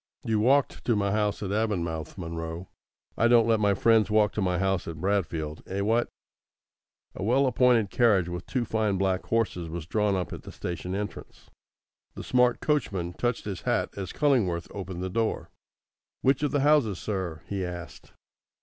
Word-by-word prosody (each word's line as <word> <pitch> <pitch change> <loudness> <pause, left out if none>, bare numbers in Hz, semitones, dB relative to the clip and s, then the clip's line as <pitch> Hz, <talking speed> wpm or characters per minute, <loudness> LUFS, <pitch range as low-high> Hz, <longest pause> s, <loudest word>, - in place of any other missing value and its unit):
You 110 -1 0
walked 135 +5 +2
to 120 - +2
my 100 -1 +1
house 105 0 0
at 95 - -3
Avonmouth, 90 -8 -2
Munro. 85 0 -5 0.5
I 115 - +3
don't 120 -1 +5
let 115 -1 +3
my 100 -1 +3
friends 110 0 +4
walk 105 -1 +3
to 105 - -3
my 90 -2 +1
house 95 -1 0
at 80 -2 -6
Bradfield 80 -5 -1
eh, 100 +1 -2
what?" 115 +4 +1 1.0
A - - -8
well 130 +6 +3
appointed 125 -5 +3
carriage 105 -8 +3
with 90 0 -6
two 125 -2 -1
fine 110 -3 0
black 95 -1 0
horses 105 -7 -1
was 85 -1 -5
drawn 105 +2 +1
up 90 -2 -3
at - - -7
the - - -10
station 90 +2 -5
entrance. 105 +1 -7 0.6
The - - -7
smart 125 -1 +2
coachman 95 - -1
touched 120 +5 -2
his 100 -4 -5
hat - - 0
as 95 -2 -5
Cullingworth 105 - +1
opened 95 -2 -5
the 95 - -2
door. 115 +2 -1 0.7
"Which 135 +1 +3
of 145 - +1
the 145 - 0
houses, 140 - +3
sir?" 90 -7 -4
he 100 -2 -3
asked. 85 -1 -8
100 Hz, 175 wpm, -27 LUFS, 90-115 Hz, 1.0 s, don't